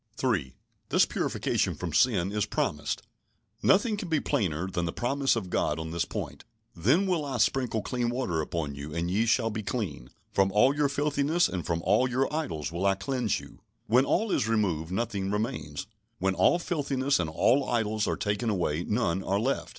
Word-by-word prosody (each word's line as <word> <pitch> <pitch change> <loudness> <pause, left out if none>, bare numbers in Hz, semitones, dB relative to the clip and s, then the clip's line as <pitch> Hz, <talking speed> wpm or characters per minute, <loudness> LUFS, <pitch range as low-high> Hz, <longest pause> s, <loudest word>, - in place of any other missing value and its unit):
3. 95 - 0 0.3
This - - +5
purification - - -1
from - - -5
sin 100 -7 +3
is 105 -1 0
promised. 75 0 -2 0.6
Nothing 210 +2 +3
can 190 -3 -5
be 160 -2 +2
plainer 85 - -1
than 90 -2 -2
the 85 - -2
promise 135 +5 +1
of 95 -6 -4
God 75 - +1
on 80 0 -5
this 85 0 0
point. - - -6 0.3
"Then 130 - +3
will 180 -5 0
I 135 -4 -3
sprinkle 115 -1 +1
clean 120 -2 -1
water 120 -10 -1
upon 75 -2 -3
you, 70 +3 -7
and 85 +1 -1
ye 110 +5 +2
shall 115 0 +2
be 110 +1 -3
clean; 95 - -4 0.2
from 95 0 +2
all 130 +7 +4
your 145 -1 +2
filthiness 145 +3 +1
and 90 -3 -4
from 85 0 -1
all 105 +7 +3
your 130 +2 +1
idols 80 - -2
will 90 +4 0
I 95 - +3
cleanse 115 +3 -1
you." - - -14 0.3
When 125 +4 +4
all 215 +7 +1
is 105 - +1
removed, 90 -8 0
nothing 100 -2 -2
remains. 95 -7 -3 0.3
When 95 +1 +1
all 170 - +4
filthiness 140 - 0
and 85 -3 -1
all 130 - +2
idols 110 -2 0
are - - 0
taken 105 +2 -1
away, 85 -5 0
none 95 -5 0
are 100 +1 0
left. 130 +5 -1
105 Hz, 190 wpm, -28 LUFS, 85-130 Hz, 0.6 s, This